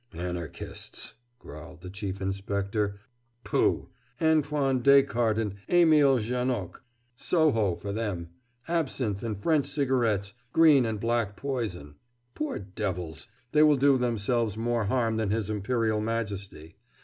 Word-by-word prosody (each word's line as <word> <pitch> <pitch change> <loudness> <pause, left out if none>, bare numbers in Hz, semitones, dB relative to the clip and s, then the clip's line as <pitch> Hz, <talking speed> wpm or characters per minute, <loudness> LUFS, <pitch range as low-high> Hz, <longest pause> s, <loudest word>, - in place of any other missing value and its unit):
"Anarchists!" 85 -1 -6 0.2
growled 80 -4 -11
the 90 0 -8
Chief 100 -1 -5
Inspector 100 +1 -2 0.4
"Pooh! - - +1 0.3
Antoine 150 -4 +2
Descartes 120 -5 +4
and 105 -3 -2
Émile 155 -6 +5
Janoc 120 -5 -2 0.3
Soho 120 - +2
for 100 +4 -6
them 100 -6 -3 0.4
absinthe 130 - -1
and 110 -3 -3
French 155 -4 +2
cigarettes 120 -8 0 0.2
green 150 -7 +6
and 110 -2 -3
black 115 -2 -1
poison. 105 - -4 0.4
Poor 150 - -3
devils! 90 -5 -5 0.2
they 150 - +4
will 150 -2 +6
do 140 +1 +5
themselves 115 -2 0
more 115 -1 0
harm 115 +1 +1
than 110 -2 0
his 110 0 -1
Imperial 110 +1 0
Majesty. 100 -7 -4
110 Hz, 120 wpm, -28 LUFS, 100-130 Hz, 0.4 s, green